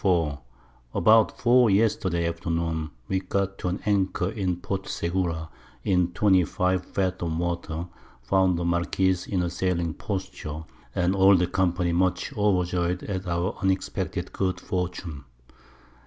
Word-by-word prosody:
24._ 80 -7 +2 0.6
About 110 +4 +4
4 120 -1 +5
Yesterday 95 -4 +2
Afternoon 85 -1 -2 0.2
we 95 - 0
got 100 +1 -2
to - - -3
an 90 +2 -1
Anchor 95 -2 +1
in 95 -5 -1
Port 95 +2 -4
Segura 85 -2 -2 0.4
in 90 -2 +2
25 95 -1 +2
Fathom 90 -4 -2
Water, 85 -1 -2 0.4
found 95 +7 +3
the 85 - -2
Marquiss 85 +2 +1
in 90 -3 0
a 85 - -1
sailing 85 -2 -1
Posture, 80 -6 -5 0.3
and 90 +2 +2
all 95 +1 +6
the 90 0 +3
Company 90 -1 0
much 90 +1 +1
overjoy'd 90 -3 +1
at 95 -2 -4
our 85 +3 -1
unexpected 95 0 -1
good 95 -1 -1
Fortune. 90 -6 -4
90 Hz, 130 wpm, -26 LUFS, 85-95 Hz, 0.6 s, all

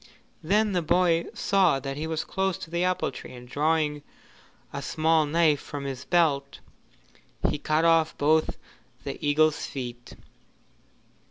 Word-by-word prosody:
Then 210 +6 +2
the 180 -2 +1
boy 170 0 +2
saw 190 -8 +2
that 135 +1 -5
he 155 +3 -4
was 160 -1 -2
close 190 -2 -1
to 165 - -10
the 170 +1 0
apple 185 -5 0
tree, 130 - -10
and 125 0 -12
drawing 150 +1 0 0.7
a - - -4
small 160 -1 +2
knife 155 -1 +3
from 145 -1 -7
his 135 -2 -5
belt, 145 -6 +1 0.9
he 150 - -1
cut 155 +2 +1
off 165 -1 +3
both 155 +2 +2 0.5
the - - -6
eagle's 150 +1 +2
feet. 120 -3 -7
155 Hz, 145 wpm, -26 LUFS, 145-170 Hz, 0.9 s, knife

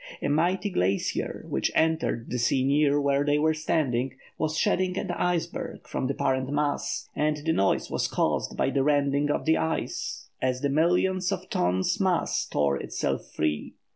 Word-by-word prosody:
A - - -2
mighty 180 +7 +1
glacier, 95 - -1
which - - 0
entered 160 -7 +1
the 125 - -1
sea 130 +2 +2
near 145 +1 +3
where 140 0 +2
they 145 0 +2
were 155 +1 +3
standing, 135 -5 0 0.2
was 155 0 -1
shedding 185 +2 +1
an 185 - -2
iceberg 175 -1 -2
from 130 - -2
the 135 - -2
parent 130 -2 0
mass, 145 0 -1
and 150 0 +1
the 160 - +2
noise 100 -8 +1
was - - 0
caused - - -1
by 135 - +1
the 135 - +1
rending 145 0 +2
of - - 0
the 160 0 +4
ice 160 0 -3
as 130 -1 0
the 140 - +1
millions 180 +5 +2
of - - -4
tons 90 +1 +1
mass 185 -3 +1
tore 70 -1 +1
itself - - -3
free. 75 -1 -2
145 Hz, 170 wpm, -27 LUFS, 130-160 Hz, 0.2 s, the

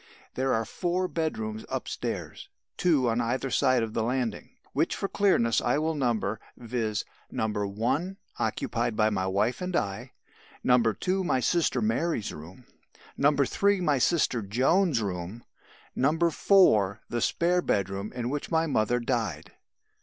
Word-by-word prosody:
"There 130 +1 0
are 115 -1 +1
four 180 - -1
bedrooms 110 -11 -3
upstairs, - - -5 0.3
two 150 -8 +2
on 115 +1 +1
either 125 +3 -1
side 130 -2 +3
of 110 -1 -4
the 115 - 0
landing 120 -1 -2 0.2
which - - +1
for 195 - -2
clearness 150 - +2
I 120 +4 +1
will 160 +2 0
number 115 -7 -1 0.2
viz., 115 -3 -2 0.2
No. 110 - -1
1 110 - -2 0.2
occupied 115 - -1
by 110 0 +2
my 95 -2 -1
wife 105 - 0
and 180 -1 -3
I; 110 - -2 0.5
No. 125 -1 +5
2 180 - 0
my 170 -7 +1
sister 130 -2 +1
Mary's 115 +2 -1
room; 85 +11 -11 0.5
No. 145 +1 +3
3 200 +8 +2
my 150 -6 +2
sister 130 -5 +2
Joan's 130 - +2
room; 95 +3 -5 0.5
No. 150 +5 +2
4 160 - +4
the 120 - -2
spare 180 +1 +2
bedroom 100 - -1
in 120 0 -3
which 145 0 -3
my 160 -1 +2
mother 120 -5 +1
died. 115 - -2
120 Hz, 145 wpm, -27 LUFS, 110-160 Hz, 0.5 s, No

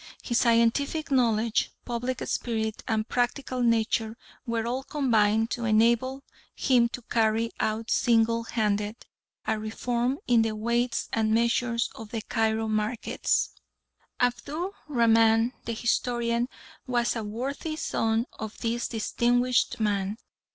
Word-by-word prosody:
His 240 -1 +1
scientific 240 +7 +2
knowledge, 230 -3 +2
public 245 +2 -3
spirit, 220 -2 -2
and 220 0 0
practical 250 +1 -1
nature 225 -1 +1 0.3
were 230 -1 -1
all 250 +3 -1
combined 225 -6 +2
to 240 - -2
enable 235 +5 +2 0.3
him 245 -3 +3
to 245 - -7
carry 225 0 +1
out 220 +1 -1
single 230 0 +3
handed 210 -1 -1 0.4
a 220 -1 0
reform 240 +4 -1
in 240 -2 +4
the 225 -1 0
weights 235 +2 0
and 220 -1 +1
measures 235 0 +1
of 220 -1 -10
the 225 -1 -4
Cairo 220 -1 0
markets. 215 +2 0 0.7
Abdu 290 +9 -1 0.2
Rahman, 230 -2 +4
the 230 - -2
historian, 235 +1 0 0.4
was 240 -1 +1
a 225 - -3
worthy 265 +9 -4
son 225 -6 0
of 220 -1 -6
this 235 0 -1
distinguished 245 +2 +1
man. 205 -1 0
230 Hz, 125 wpm, -27 LUFS, 220-245 Hz, 0.7 s, in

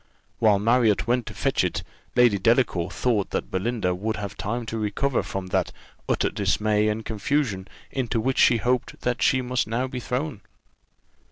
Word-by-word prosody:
While 105 -3 +5
Marriott 115 0 +3
went 120 0 0
to - - -7
fetch - - +1
it, - - -2 0.3
Lady 120 -5 +5
Delacour 110 -5 +2
thought 105 0 0
that - - -3
Belinda 95 -1 0
would 110 +5 -2
have 100 -1 -5
time 115 +3 -3
to 110 0 -4
recover 115 +6 0
from 95 -1 -5
that - - 0 0.4
utter - - +1
dismay 105 +1 +1
and 110 +1 -2
confusion 110 -3 -1 0.2
into 125 -3 -1
which 130 +4 0
she 120 - +6
hoped 125 +2 -1
that 125 0 -1
she 130 -1 +3
must 125 -1 -1
now 115 +4 -1
be 130 -1 -5
thrown. 125 -1 -3
115 Hz, 170 wpm, -25 LUFS, 105-125 Hz, 0.4 s, she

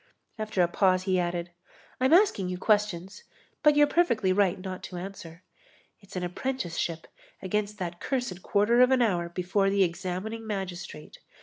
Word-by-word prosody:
After 215 -4 +1
a - - +3
pause 185 +1 +2
he 185 -1 +1
added: 175 0 -2 0.5
"I'm 260 +2 +2
asking 335 - +4
you 180 - -3
questions, 205 - 0 0.4
but 300 -1 +5
you're 295 0 +6
perfectly 235 - +2
right 195 -1 +2
not 185 0 -6
to 180 - -9
answer. 175 -2 -9 0.6
It's 195 -3 -15
an 180 - -2
apprenticeship 175 -5 -3 0.3
against 210 +2 -2
that 175 -3 -5
cursed 245 -9 -3
quarter 215 +6 +3
of 250 - +6
an 260 -2 +4
hour 175 -6 0
before 185 +3 0
the 200 0 +3
examining 190 +5 -4
magistrate. 185 -6 -6
190 Hz, 160 wpm, -28 LUFS, 180-215 Hz, 0.6 s, you're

